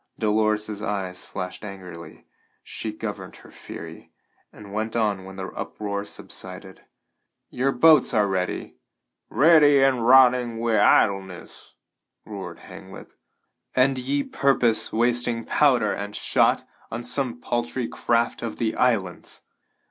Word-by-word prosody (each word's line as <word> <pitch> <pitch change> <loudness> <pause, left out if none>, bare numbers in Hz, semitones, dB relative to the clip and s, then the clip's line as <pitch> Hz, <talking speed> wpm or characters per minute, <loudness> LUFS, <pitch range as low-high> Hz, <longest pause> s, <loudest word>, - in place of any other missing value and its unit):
Dolores's 105 -1 0
eyes 95 -4 -4
flashed 90 +1 -6
angrily; 90 -5 -10 0.4
she - - -5
governed - - -7
her - - -16
fury, - - -10 0.4
and 100 -2 -13
went 110 +2 -3
on 105 -5 0
when 95 0 -10
the 95 0 -6
uproar 100 -1 -5
subsided: 95 -1 -7 0.7
"Your 135 +2 0
boats 155 +4 +5
are 105 -1 +2
ready?" 95 -2 -3 0.5
"Ready 145 -2 +5
and 130 -3 +2
rotting 125 -2 +5
wi' 115 -1 +1
idleness!" 95 -3 +1 0.5
roared - - -8
Hanglip. - - -12 0.6
"And 130 +1 +3
ye 140 +3 -1
purpose 125 -5 +1
wasting 120 0 +1
powder 125 -8 +2
and 100 +1 -6
shot - - +2 0.3
on 120 +1 -5
some 120 0 -2
paltry 120 0 -2
craft 115 0 -1
of 115 -2 -5
the 110 -2 -1
islands! 105 -8 -1
115 Hz, 120 wpm, -24 LUFS, 100-125 Hz, 0.7 s, boats